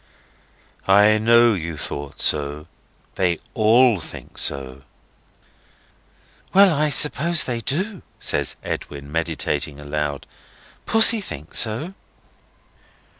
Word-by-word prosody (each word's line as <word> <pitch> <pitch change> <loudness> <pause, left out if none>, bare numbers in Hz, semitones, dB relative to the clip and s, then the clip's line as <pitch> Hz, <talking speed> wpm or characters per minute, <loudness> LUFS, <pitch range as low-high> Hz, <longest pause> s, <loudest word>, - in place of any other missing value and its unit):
"I 105 +2 +5
know 115 +1 +4
you 85 -4 -5
thought 70 -1 -6
so. 75 0 0 0.5
They 90 -3 0 0.2
all 115 0 +3
think 75 - -10
so." 65 -1 -1 1.7
"Well, 195 -2 +6
I 150 0 0
suppose 150 +4 +2
they 120 -2 -4
do," 185 - -1 0.2
says - - 0
Edwin, 70 0 -7
meditating 80 -3 -2
aloud. 75 -1 -4 0.6
"Pussy 225 0 +4
thinks 75 - -2
so." 120 - 0
105 Hz, 95 wpm, -21 LUFS, -, 1.7 s, Well